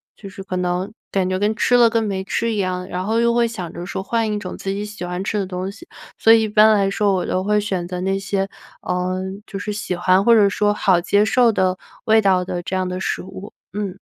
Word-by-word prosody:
就 200 - -11
是 195 0 -10
可 185 - -5
能 180 +2 -1 0.2
感 190 -2 0
觉 185 - 0
跟 210 +2 0
吃 245 - +2
了 240 -1 +7
跟 225 0 +1
没 195 -2 -2
吃 230 +4 -1
一 215 - -2
样， 185 -2 -2
然 180 +1 -4
后 220 +2 +1
又 235 0 +3
会 240 -1 +3
想 185 -7 -6
着 175 - -7
说 190 - -4
换 225 +2 -1
一 210 - -1
种 185 -3 -7
自 195 - -4
己 200 +1 -3
喜 210 -3 -7
欢 180 +1 -4
吃 210 +1 -2
的 200 - 0
东 185 +1 -4
西。 220 - -14 0.3
所 225 - +6
以 225 - +5
一 220 - 0
般 215 +1 +6
来 200 -2 +2
说 200 0 +1
我 185 - 0
都 185 - -1
会 210 +1 +2
选 185 -4 -3
择 180 0 -5
那 195 +1 0
些， 195 0 -2 0.3
呃， 180 +1 -2 0.2
就 195 - -7
是 210 - -4
喜 205 -3 -3
欢 185 +2 +3
或 235 - +6
者 210 -3 +5
说 205 +1 +1
好 190 -4 +3
接 200 +4 +2
受 235 +2 +4
的 185 -3 +1 0.3
味 220 -1 +5
道 190 -3 +3
的 180 -1 -4
这 190 - -3
样 185 -1 -1
的 180 0 -4
食 - - -2
物。 190 +2 -10 0.2
嗯。 200 -2 -4
195 Hz, 280 characters per minute, -20 LUFS, 185-210 Hz, 0.3 s, 了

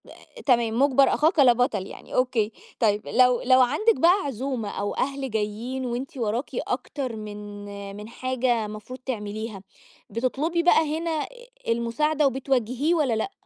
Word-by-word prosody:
آآ، - - -14
تمام 235 -3 +2
مُجبر 275 0 +4
أخاك 315 +2 +2
لا 255 -3 +7
بطل 230 -5 0
يعني - - -10
أوكي، 245 -4 +1 0.3
طيب 210 -2 +1
لو 250 0 +4
لو 255 0 +5
عندِك 310 - +3
بقى 355 +4 +5
عزومة 255 -4 -3
أو 205 0 -3
أهل 275 0 -2
جايين 220 +5 -2
وأنتِ 250 +3 -4
وراكِ 230 +2 -1
أكتر 260 -5 -3
من 205 -1 -8
من 210 +1 -8
حاجة 245 -2 0
مفروض 215 +5 -8
تعمليها 215 -4 -5 0.5
بتطلبي 275 - 0
بقى 315 -3 +4
هنا 335 0 -2
آآ، - - -4 0.4
المساعدة 280 +6 +1
وبتوجهيه 265 +3 0
والّا 290 -7 +2
لأ؟ 225 - -1
250 Hz, 145 wpm, -25 LUFS, 220-275 Hz, 0.5 s, لا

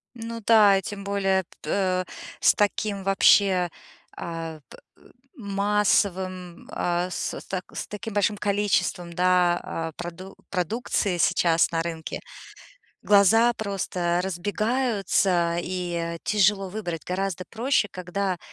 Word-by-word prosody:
Ну 230 0 -6
да, 210 -4 +6
и - - -1
тем 200 +1 -7
более, 195 -1 +1 0.2
п - - -7
э, 185 -2 +1 0.3
с - - +5
таким 205 -1 0
вообще, 195 -2 +4 0.5
а, 165 -2 -6
п - - -13 0.2
э, - - -25 0.3
массовым, 195 - 0
а, 175 +1 -1
с - - -3 0.2
т 185 -1 -3
с - - -5
таким 220 +1 -6
большим 205 0 +1
количеством, 200 -4 0
да, 180 0 +3
а, 165 0 -4
проду 175 +2 -8 0.2
продукции 195 0 -1
сейчас 165 -1 +3
на 165 -1 0
рынке 165 -1 -5 0.8
глаза 220 +4 +5
просто 185 -5 -2
разбегаются 195 -3 0
и 175 -2 -3
тяжело 195 -2 +2
выбрать. 180 -6 -5
Гораздо 185 0 -3
проще 240 -2 +1
когда, 185 +1 -3
190 Hz, 120 wpm, -25 LUFS, 175-205 Hz, 0.8 s, да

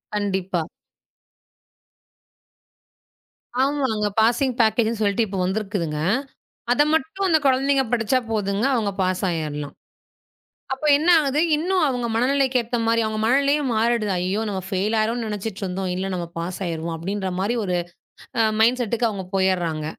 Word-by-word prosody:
கண்டிப்பா. 190 -4 -1 3.0
ஆமாங்க. 265 -7 +1
பாசிங் 240 +4 +3
பேக்கேஜ்னு 225 0 +2
சொல்லிட்டு 205 +2 +2
இப்ப 195 -1 -5
வந்திருக்குதுங்க. 190 -5 -2 0.7
அத 250 - +4
மட்டும் 320 +6 0
அந்த 320 - +5
குழந்தைங்க 270 +1 +3
படிச்சா 240 +2 +2
போதுங்க, 205 +1 0
அவங்க 215 -4 0
பாஸ் 185 0 0
ஆயிரலாம். 150 -4 -4 1.0
அப்ப 270 +3 -3
என்ன 320 - -1
ஆகுது? 285 0 0 0.2
இன்னும் 360 +4 0
அவங்க 245 -2 -1
மனநிலைக்கு 260 +1 +2
ஏத்த 235 +1 -3
மாரி, 230 0 +3
அவங்க 215 0 -3
மனநிலையும் 280 +3 +2
மாறிடுது. 225 -2 +1
அய்யோ! 185 +4 -1
நாம 190 -2 -3
ஃபெயில் 200 +4 0
ஆயுருவோம்னு 230 +2 -1
நினைச்சுட்டு 210 -1 -5
இருந்தோம். 185 0 -3
இல்ல 185 +1 -2
நம்ம 175 -1 -3
பாஸ் 175 +2 -4
ஆயிருவோம் 165 0 -3
அப்படின்ற 190 +3 -3
மாரி 215 +5 0
ஒரு 180 -2 0 0.6
அ - - +6 0.2
மைண்ட்செட்க்கு 235 0 +2
அவங்க 195 -3 -5
போயறாங்க. 175 -5 0
215 Hz, 130 wpm, -23 LUFS, 190-250 Hz, 3.0 s, அ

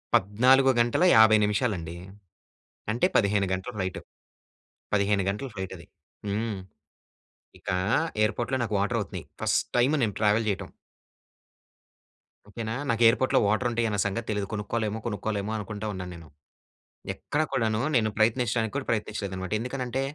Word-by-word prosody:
14 130 +7 +4
గంటల 120 +8 +2
50 110 -1 +7
నిమిషాలండి. 100 -6 -1 1.0
అంటే, 120 +10 +2
15 100 -1 +3
గంటల 95 +6 -3
ఫ్లైట్. 95 -3 -3 0.9
15 100 -1 +2
గంటలు 105 +7 -3
ఫ్లైట్ 95 -2 -5
అది. 85 - -14 0.4
హ్మ్. 105 0 -2 1.0
ఇక - - -13 0.5
ఎయిర్‌పోర్ట్‌లో 120 +4 0
నాకు 110 -2 -3
వాటర్ 115 +4 0
అవుతున్నాయి. 100 - -6 0.2
ఫస్ట్ - - +1
టైమ్ 125 +5 +3
నేను 105 -4 0
ట్రావెల్ 110 +1 +3
చేయటం. 100 - -2 1.8
ఓకేనా, 110 +1 -4 0.2
నాకు 115 0 0
ఎయిర్‌పోర్ట్‌లో 130 +3 +3
వాటర్ 110 +4 +1
ఉంటాయి 115 0 0
అన్న 105 -1 -2
సంగతి 110 +3 -2
తెలీదు. 105 -2 -2
కొనుక్కోలేమో, 110 +1 -2
కొనుక్కోలేమో 105 -1 -3
అనుకుంటా 105 0 -5
ఉన్నా 90 -1 -5
నేను. 85 -2 -12 0.9
ఎక్కడ 150 - -2
కూడాను 110 -2 0
నేను 110 -3 +3
ప్రయత్నించడానికి 115 0 +1
కూడా 140 -2 -2
ప్రయత్నించలేదన్నమాట. 100 -4 -3
ఎందుకనంటే, 125 +1 -3
110 Hz, 130 wpm, -27 LUFS, 100-115 Hz, 1.8 s, 50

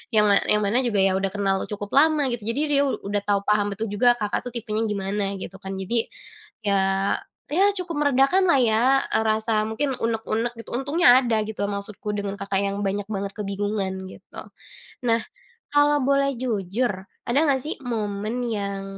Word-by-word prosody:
yang 210 - +6
ma 200 - +6
yang 210 0 +3
mana 215 +5 +2
juga 210 -4 +1
ya 195 - +4
udah 195 - 0
kenal 195 -1 +1
cukup 205 -1 -6
lama 310 -1 +4
gitu, 235 -3 -4
jadi 230 +5 -1
dia 280 0 +4
udah 205 -5 -2
tahu 200 -1 +3
paham 205 -1 +1
betul 220 +2 -3
juga 240 +3 +4
Kakak 210 -3 -1
tuh - - -5
tipenya 220 -1 -2
gimana 200 0 -2
gitu 190 0 -8
kan. 195 -1 -6
Jadi 230 +4 0 0.6
ya 200 - +3 0.8
ya 390 +5 +4
cukup 340 -5 -3
meredakanlah 285 +5 +4
ya, 220 -1 +2 0.3
eee, - - +3
rasa 220 +1 +1 0.2
mungkin 270 +5 -1
unek-unek 230 +1 -1
gitu, 230 - -10
untungnya 270 0 +5
ada 235 -3 0
gitu 220 -1 -7
maksudku 200 +1 -6
dengan 200 -1 -3
Kakak 195 0 0
yang 200 +1 -2
banyak 200 0 -1
banget 200 0 -3
kebingungan 200 -1 -2 0.2
gitu. - - -15 0.7
Nah 230 0 +3 0.5
kalau 290 0 +4
boleh 275 0 +2
jujur 220 0 -1 0.4
ada 240 +4 +2
nggak 270 -3 +2
sih 310 - -3
momen 215 0 -3
yang 200 -3 -3
215 Hz, 175 wpm, -24 LUFS, 200-250 Hz, 0.8 s, yang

